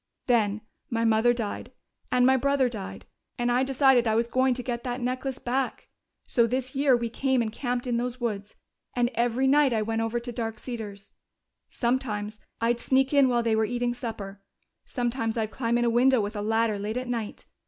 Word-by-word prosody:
"Then 215 -4 +2 0.3
my 230 0 0
mother 225 +2 +4
died, 230 -4 -4 0.4
and 250 0 +4
my 265 +1 +5
brother 275 0 +2
died, 215 -6 -7 0.3
and 240 -1 +1
I 245 +1 +3
decided 265 -2 +4
I 220 - +2
was 230 +1 +2
going 255 +1 +2
to 250 - -4
get 235 -1 -3
that 245 0 -3
necklace 255 +1 -2
back. 260 0 -2 0.4
So 235 -3 +3
this 255 +2 -2
year 275 -2 +4
we 235 0 -2
came 265 +3 0
and 225 -2 0
camped 245 +1 -2
in 240 -2 0
those 245 +1 -3
woods, 210 -4 -3 0.4
and 245 0 +1
every 240 +3 +1
night 280 -1 +4
I 220 -1 +1
went 225 +1 -1
over 225 +1 -1
to 240 +1 -7
Dark 225 -2 -4
Cedars. 210 -5 -7 0.6
Sometimes 220 -4 -2 0.2
I'd 235 +1 +1
sneak 265 +3 +2
in 280 -2 +5
while 240 -1 +2
they 225 -1 +2
were 220 - +2
eating 240 +2 -1
supper; 210 -5 -6 0.4
sometimes 240 -2 -2
I'd 220 -1 -1
climb 235 -2 0
in 240 - +1
a - - +3
window 255 +2 +4
with 210 +1 -2
a 205 - -2
ladder 220 0 +1
late 210 +3 -3
at 255 0 -3
night. 230 -4 -4
240 Hz, 200 wpm, -27 LUFS, 225-255 Hz, 0.6 s, my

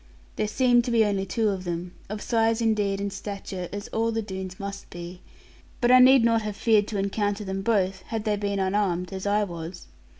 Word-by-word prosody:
There 215 - -1
seemed 245 +2 +3
to - - -2
be 230 -2 +4
only 195 -2 -1
two 220 +2 +1
of 190 -2 -3
them, 175 0 -4 0.2
of 210 0 -5
size 225 -1 +2
indeed 210 -4 +1
and 200 0 -3
stature 195 -2 -6
as 205 +1 -5
all 225 +1 0
the 225 0 -2
Doones 190 -2 -6
must 200 0 -6
be, 175 +1 -9 0.6
but 240 0 +3
I 255 - +8
need 260 -1 +7
not 230 -1 +3
have 210 -1 -4
feared 215 -1 +3
to 210 - -3
encounter 205 +1 -1
them 190 0 -3
both, 195 -3 +1
had 225 -2 -3
they 215 -1 +1
been 200 -1 -2
unarmed, 190 -2 0
as 190 +1 -4
I 210 +1 +2
was. 170 -2 -7
205 Hz, 210 wpm, -26 LUFS, 190-225 Hz, 0.6 s, I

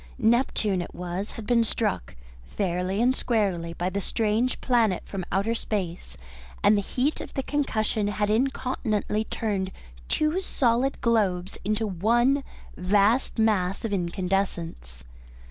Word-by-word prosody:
Neptune 220 -5 +2
it - - -8
was 180 +3 -4
had 225 - -7
been 235 0 +3
struck, 215 - -2 0.3
fairly 185 - -1
and 255 +2 +3
squarely, 190 -10 0
by 175 +1 -2
the 200 +2 -2
strange 225 +5 0
planet 230 -7 +2
from 195 -2 -5
outer 200 +4 +1
space, 180 - -3 0.5
and 210 - +6
the 205 - +2
heat 260 +9 -1
of - - -9
the 270 - -1
concussion 220 -8 0
had 205 0 0
incontinently 220 -3 0
turned 200 -5 -2 0.4
two 310 +5 +1
solid 255 -5 +1
globes 200 -6 +1
into 215 +2 0
one 240 +8 +2 0.3
vast 205 +8 +2
mass 205 -3 +1
of 215 - -2
incandescence. 175 - -2
210 Hz, 130 wpm, -26 LUFS, 185-235 Hz, 0.5 s, and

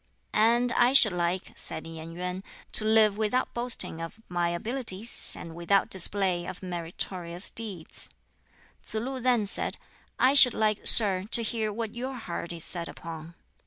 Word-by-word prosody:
"And 235 +3 +3
I 245 +2 +3
should 230 -6 +7
like," 175 +1 -2
said - - -7
Yen 165 0 -9
Yuen, 180 +2 -5 0.3
"to - - +2
live 215 -1 +3
without 220 +4 -1
boasting 240 -8 -2
of 165 +6 -8
my 175 -1 -1
abilities, 225 +3 -1
and 165 - -9
without 175 +4 +1
display 185 -1 0
of - - -8
meritorious 175 0 -3
deeds." 200 -8 -6 0.7
Tsz - - -7
lu 260 +4 -3
then 245 -3 +1
said, 200 - -1 0.4
"I 260 +2 +4
should 260 -4 +7
like, 215 -1 0
sir, 195 -4 +8
to 235 - 0
hear 220 -1 -2
what 220 0 -5
your 255 +3 -5
heart 175 -7 -6
is 170 -2 -6
set 170 -2 -1
upon." 165 -1 -10
200 Hz, 160 wpm, -27 LUFS, 175-230 Hz, 0.7 s, sir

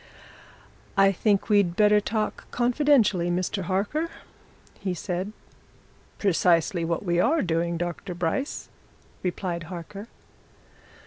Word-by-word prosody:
"I 195 0 +6
think 200 +1 +1
we'd 200 -5 +3
better 210 0 +5
talk 215 +1 -3
confidentially, 240 - +3
Mr. 180 +2 -1
Harker," 205 - -1 0.7
he 190 -3 -2
said. 185 +3 -3 0.9
"Precisely 175 -2 +2
what 165 +3 -2
we 175 -1 +1
are 310 - +3
doing, 170 0 0
Dr. 175 +2 -4
Bryce," 180 - -2 0.5
replied 175 -2 -3
Harker. 190 +4 -7
190 Hz, 105 wpm, -26 LUFS, 175-210 Hz, 0.9 s, I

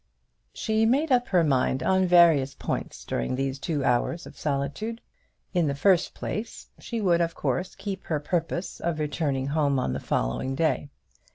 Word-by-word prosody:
She 220 0 0
made 280 +6 +2
up 245 -1 +3
her 180 -3 +3
mind 130 -3 +1
on 190 0 +3
various 165 -6 +5
points - - -4
during 60 - -2
those 135 +1 -2
two 145 -1 -2
hours 125 +7 +1
of - - -12
solitude. 145 +11 -2 0.5
In 175 -4 +2
the 140 - -1
first 180 +4 +3
place, 220 +2 -5
she 235 - -4
would 175 -5 +3
of 165 -1 -1
course 180 +1 -2
keep 195 -2 -6
her 155 -3 -1
purpose 170 +4 -2
of 170 -2 -1
returning 145 -3 -1
home 145 -2 +1
on 65 - 0
the 70 - -2
following 100 - -1
day. 155 -1 0
160 Hz, 170 wpm, -26 LUFS, 140-185 Hz, 0.5 s, various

